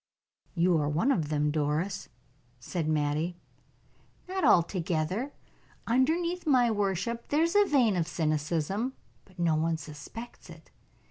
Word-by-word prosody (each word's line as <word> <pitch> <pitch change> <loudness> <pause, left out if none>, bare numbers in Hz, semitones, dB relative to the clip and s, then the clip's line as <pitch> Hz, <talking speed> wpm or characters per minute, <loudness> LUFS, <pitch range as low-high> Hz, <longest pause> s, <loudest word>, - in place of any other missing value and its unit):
"You 170 -1 +3
are 145 -1 0
one 170 - +2
of 160 - 0
them, 150 -1 +1
Doris," 150 +1 -1 0.5
said 155 +5 -3
Mattie. 155 +3 0 0.9
"Not 375 0 -3
altogether. 180 - +2 0.5
Underneath 330 +8 +1
my 250 -5 +4
worship 205 +3 -1
there 300 +3 +3
is 335 +3 0
a 410 0 +6
vein 250 - +3
of 170 -3 0
cynicism, 165 - -1 0.3
but 185 -1 -22
no 170 -2 +2
one 160 +1 +1
suspects 155 +10 -10
it. - - -14
180 Hz, 130 wpm, -29 LUFS, 155-240 Hz, 0.9 s, a